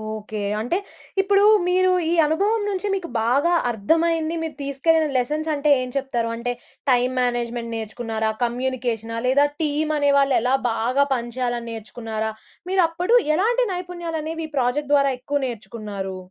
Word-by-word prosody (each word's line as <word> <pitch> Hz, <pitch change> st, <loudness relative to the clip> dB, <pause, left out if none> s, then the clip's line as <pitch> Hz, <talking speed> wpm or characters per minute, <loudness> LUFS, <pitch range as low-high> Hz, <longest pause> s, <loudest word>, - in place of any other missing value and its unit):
Okay. 215 Hz, 0 st, -6 dB, 0.2 s
అంటే 245 Hz, +11 st, 0 dB, 0.4 s
ఇప్పుడు 400 Hz, +1 st, +3 dB, 0.2 s
మీరు 370 Hz, +1 st, +3 dB, 0.2 s
ఈ -, -, +1 dB
అనుభవం 400 Hz, +9 st, +1 dB
నుంచి 395 Hz, 0 st, -2 dB
మీకు 375 Hz, -3 st, -5 dB
బాగా 275 Hz, +9 st, +2 dB, 0.2 s
అర్థమైంది 325 Hz, +8 st, +1 dB
మీరు 320 Hz, -, -5 dB
తీసుకెళ్ళిన 310 Hz, +3 st, +2 dB
లెసన్స్ 300 Hz, +6 st, -1 dB
అంటే 295 Hz, 0 st, 0 dB
ఏం 255 Hz, -, -4 dB
చెప్తారు? 245 Hz, -4 st, -1 dB
అంటే 235 Hz, +1 st, -2 dB, 0.4 s
టైమ్ 250 Hz, +1 st, +2 dB
మేనేజ్మెంట్ 240 Hz, -1 st, -2 dB
నేర్చుకున్నారా? 220 Hz, 0 st, -3 dB
కమ్యూనికేషనా? 240 Hz, -2 st, -2 dB
లేదా 280 Hz, +3 st, +4 dB, 0.2 s
టీమ్ 305 Hz, +1 st, 0 dB
అనే 285 Hz, -1 st, +3 dB
వాళ్ళు 275 Hz, -1 st, +3 dB
ఎలా 250 Hz, +3 st, +2 dB, 0.2 s
బాగా 245 Hz, +5 st, +1 dB
పనిచేయాలని 240 Hz, 0 st, -3 dB
నేర్చుకున్నారా? 220 Hz, 0 st, -4 dB, 0.4 s
మీరప్పుడు 360 Hz, +3 st, +2 dB, 0.2 s
ఎలాంటి 475 Hz, +8 st, +2 dB
నైపుణ్యాలనేవి 330 Hz, -3 st, -4 dB
ఈ -, -, -31 dB
ప్రాజెక్ట్ 270 Hz, +3 st, 0 dB
ద్వారా 280 Hz, -1 st, +4 dB
ఎక్కువ 285 Hz, +3 st, -1 dB
నేర్చుకున్నారు? 210 Hz, -5 st, -6 dB
270 Hz, 135 wpm, -22 LUFS, 235-325 Hz, 0.4 s, లేదా